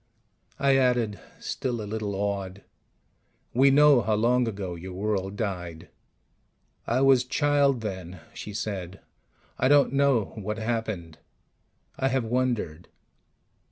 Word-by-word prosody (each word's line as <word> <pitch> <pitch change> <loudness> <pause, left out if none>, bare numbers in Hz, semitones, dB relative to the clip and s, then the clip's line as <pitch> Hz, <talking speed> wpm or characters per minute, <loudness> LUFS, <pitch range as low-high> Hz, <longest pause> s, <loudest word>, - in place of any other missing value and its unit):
I 135 -1 +3
added, 125 -5 +1 0.2
still 125 -3 -3
a 105 - -4
little 105 -1 -3
awed: 100 -1 -3 0.9
"We 135 +3 +5
know 145 -2 +6
how 110 -2 +1
long 120 +3 +2
ago 95 -4 -4
your 90 +2 -8
world 100 0 -2
died." 90 -6 -5 1.0
"I 120 +3 +1
was 135 -2 +5
child 140 -1 +2
then," 95 -4 -6
she 105 - -7
said, 100 -3 -5 0.6
"I - - +3
don't 140 0 +4
know 135 -7 +2
what 105 0 -4
happened. 110 -8 -3 0.8
I 135 - +2
have 130 -1 0
wondered." 115 -9 -1
110 Hz, 125 wpm, -26 LUFS, 95-130 Hz, 1.0 s, know